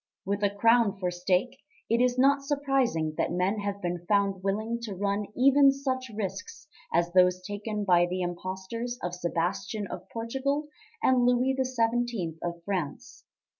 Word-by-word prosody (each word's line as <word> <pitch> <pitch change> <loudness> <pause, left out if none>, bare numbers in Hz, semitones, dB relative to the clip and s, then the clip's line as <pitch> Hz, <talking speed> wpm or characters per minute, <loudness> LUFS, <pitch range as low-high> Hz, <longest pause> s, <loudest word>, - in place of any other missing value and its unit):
With 200 +2 -1
a 205 - +3
crown 225 0 +3
for 180 -2 -1
stake, 180 +9 0 0.3
it 230 +2 +2
is 250 0 +2
not 275 +2 +4
surprising 270 - 0
that - - +1
men 185 +4 0
have 200 -1 -4
been 175 -1 -2
found 200 -2 +2
willing 215 +4 -1
to 215 -4 -5
run 200 +1 -1
even 275 +2 +6
such 260 -2 -3
risks 265 - -5 0.2
as 170 +1 +1
those 180 0 +5
taken 205 +2 -4
by 175 -2 +4
the 180 +1 -2
impostors 190 +7 -4
of 175 0 -2
Sebastian 180 +4 -2
of 185 -1 -8
Portugal 270 +6 -2 0.3
and 255 -1 +4
Louis 250 +2 +3
XVII 240 -8 0
of 170 -1 -4
France. 195 +5 -4
205 Hz, 155 wpm, -28 LUFS, 185-250 Hz, 0.3 s, even